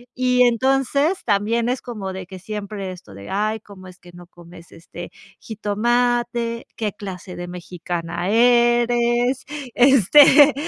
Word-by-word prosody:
y 250 0 +2
entonces 270 - +1
también 225 +2 0
es 250 +1 -2
como 205 -6 -6
de 190 0 -7
que 190 -1 -10
siempre 200 -1 -6
esto 140 - -13
de: 100 0 -11
"Ay, 215 +2 -1
cómo 195 -3 -14
es 180 - -17
que 180 - -16
no 175 0 -14
comes, 170 -1 -16
este, 175 +1 -11 0.3
jitomate, 235 +2 -1
¿qué 215 -4 -3
clase 190 -3 -9
de 175 0 -7
mexicana 175 0 -5
eres?, 240 +2 +2 0.3
este, 275 - +6
215 Hz, 135 wpm, -21 LUFS, 185-240 Hz, 0.3 s, este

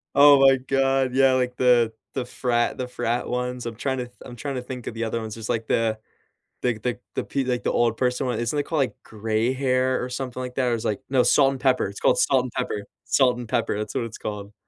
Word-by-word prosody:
Oh 145 0 +8
my 135 0 +6
god. 135 0 +1
Yeah, 135 -1 +5
like, 125 -1 0
the 120 -3 +4 0.2
the 130 -2 -2
frat 120 -1 0
the 125 - -3
frat 120 -1 -2
ones. 125 0 -3
I'm 115 - -5
trying 130 +3 -2
to 125 - -3
th 120 - -19
I'm 120 - -10
trying 135 +3 -4
to 125 - -2
think 125 -1 -7
of - - -4
the 115 0 -3
other 115 +1 -2
ones. 110 -1 -6
It's 110 -1 -7
like 115 -1 -1
the 110 -1 +1 0.6
the 120 -3 0
the 120 +2 -3 0.2
the - - -2
pe 135 -1 -2
like, 125 -1 -2
old 115 -1 +2
person 125 +1 0
one. 120 -3 -1
Isn't 120 +5 -1
it 145 - 0
called, 160 -3 -1
like, 130 -1 0
gray 110 +2 -1
hair, 130 -1 +1
or 125 - -3
something 130 0 -5
like 125 0 -7
that, 130 - +1
or 120 - +2
is 115 - -4
like 105 - -1
No, 130 -1 +3
Salt 135 +1 +4
and 135 - -6
Pepper. 130 -1 +2
It's 100 +1 -8
called - - +3
Salt 130 -2 +3
and 125 - -6
Pepper. 105 - -2 0.2
Salt 125 -3 +3
and 120 -2 -7
Pepper, 105 - 0
that's 105 0 -4
what - - -1
it's 115 -1 -8
called. 105 -1 -6
125 Hz, 260 wpm, -24 LUFS, 115-130 Hz, 0.6 s, Oh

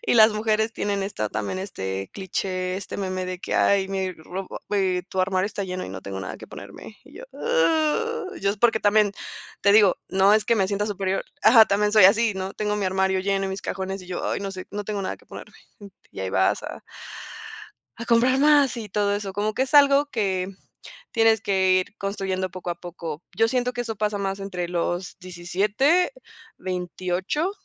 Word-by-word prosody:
y 460 - +1
las 220 -1 +7
mujeres 220 +1 0
tienen 200 -1 -2
esta 195 - -3
también 105 - -3
este 95 - -5
cliché, 185 -1 -3
este 195 - -6
meme 185 -1 -3
de 185 0 -4
que: - - -4
"Ay, 195 -1 +3
mi 190 -1 -2
ropa 180 +4 -7
ve 190 -3 +1
tu 190 - -1
armario 185 +1 +1
está 205 -1 -4
lleno 185 0 -4
y - - -7
no 95 0 -7
tengo 95 -1 -6
nada 95 - -6
que - - -11
ponerme". 215 - -11
Y 285 - -14
yo, - - -8
uh 445 -1 0
yo, 200 - +2
es, 205 - -4
porque 225 -1 +3
también, 205 -1 +3 0.5
te 200 0 +5
digo, 205 -3 +6
no 195 +2 +4
es 215 - +2
que 235 - +3
me 195 - +2
sienta 205 0 -1
superior, 195 -2 -2 0.2
ajá, 225 0 +8
también 210 0 +1
soy 215 -4 +7
así, 215 +1 +5
¿no? 190 0 -4
Tengo 210 0 -2
mi 205 - -1
armario 190 0 +1
lleno, 195 0 0
y - - -3
mis 190 0 -5
cajones, 190 0 -4
y 180 - -13
yo: 180 - -4
"Ay, - - -2
no 200 -1 -4
sé, 185 -1 -8
no 205 0 -4
tengo 205 -1 -3
nada - - -3
que - - -24
ponerme", - - -11 0.2
mm. 205 - -11 0.2
Y - - -7
ahí 95 -1 -3
vas 95 0 +2
a - - -7 1.2
a 230 - -5
comprar 240 +3 +3
más 285 -2 +4
y 220 -4 -6
todo 205 0 +1
eso. 205 -2 -4
Como 210 +2 -1
que 260 - +1
es 270 - -4
algo 285 0 +6
que 190 -5 -1 0.6
tienes 225 -2 +3
que 190 -3 +2
ir 185 +3 +1
construyendo 190 -2 -2
poco 180 -1 -6
a 175 - -2
poco. 170 -2 -7
Yo 225 +3 +3
siento 250 0 0
que 245 - -2
eso 225 -2 -4
pasa 210 -1 -1
más 195 0 -2
entre 180 -3 -4
los 175 +1 -2
17, 205 - +1 0.4
28, 185 - -2
195 Hz, 210 wpm, -24 LUFS, 185-220 Hz, 1.2 s, ajá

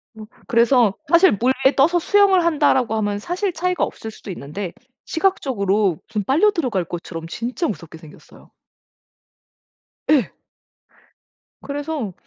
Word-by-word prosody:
어 215 -1 -10 0.2
그래서 235 -2 +3 0.2
사실 340 +2 +6
'물에 245 +6 +1 0.2
떠서 330 +6 +4
수영을 390 -1 +3
한다.'라고 265 -7 +2
하면 205 -1 -1
사실 370 - -2
차이가 360 +2 -1
없을 220 - -5
수도 215 - -12
있는데 175 +4 -6 0.3
시각적으로 215 - 0
좀 210 -3 -3
빨려 325 - +3
들어갈 250 - -1
것처럼 165 -1 -7
진짜 245 - -3
무섭게 165 - -7
생겼어요. 155 -1 -17 1.6
예. 275 -9 +3 1.3
그래서 285 -7 -4
245 Hz, 285 characters per minute, -21 LUFS, 200-335 Hz, 1.6 s, 사실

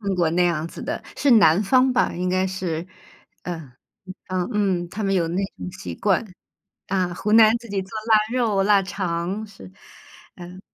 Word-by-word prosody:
看 200 -2 -2
过 170 -3 +2
那 180 +2 +2
样 165 -2 0
子 - - -9
的， - - -4 0.2
是 285 - +2
南 200 -4 +5
方 255 +4 +3
吧， 250 - +1
应 180 +1 -2
该 185 +1 +1
是， 185 -3 -3 0.6
嗯， 160 -7 -6 0.6
嗯， 185 -1 -2
嗯， 185 -4 0
他 210 +3 -5
们 195 - 0
有 175 -3 +1
那 170 - -4 0.2
种 - - -6
习 190 - -7
惯， 195 +2 +1 0.6
啊， 185 -2 -1
湖 210 +4 -2
南 220 0 +7
自 235 0 -14
己 200 -1 -2
做 190 - -11 0.2
腊 220 -1 +6 0.2
肉、 220 -6 +1
腊 200 0 +4
肠， 185 +1 -3
是， 145 - -14 0.7
嗯。 180 +1 -10
190 Hz, 195 characters per minute, -23 LUFS, 175-210 Hz, 0.7 s, 南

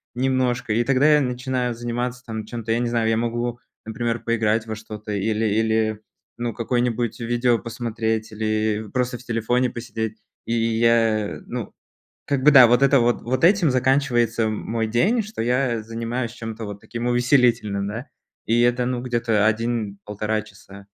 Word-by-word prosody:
немножко, 125 -3 0
и 120 +2 +2
тогда 135 +4 +4
я 150 - +4
начинаю 125 -1 -2
заниматься 120 +1 -3
там 110 -2 -5
чем-то, 115 -1 -5
я 115 - +2
не 120 -1 0
знаю, 115 -2 0
я 110 - +2
могу, 120 +1 -2 0.3
например, 115 +1 -2
поиграть 115 -1 0
во 110 - -4
что-то, 110 -1 -8
или 110 +2 0
или, 110 0 +1 0.4
ну, 120 0 -2
какое-нибудь 120 -1 -1
видео 120 0 +1
посмотреть, 115 -1 -3
или 110 0 -1
просто 125 -1 -1
в - - -14
телефоне 120 +2 0
посидеть, 110 -2 -5 0.3
и 115 - -2
я, 115 -2 +2
ну, - - -6 0.5
как 140 -2 0
бы 150 - +7
да, 130 -4 +9
вот 125 +3 +4
это 140 -1 +5
вот 120 0 +1
вот 130 +6 -2
этим 175 -5 +5
заканчивается 125 -3 +2
мой 110 +1 -2
день, 190 - +2
что 215 - -6
я 120 -1 +1
занимаюсь 115 +2 -4
чем-то 115 -2 -6
вот 105 0 -7
таким 120 +3 -5
увеселительным, 120 -5 +2
да, 115 +6 -5 0.4
и 115 +1 +2
это, 120 +1 +2
ну, 125 -1 -2
где-то 115 -4 +1
1-1,5 110 -2 -2
часа. 100 -1 -14
115 Hz, 160 wpm, -23 LUFS, 110-125 Hz, 0.5 s, да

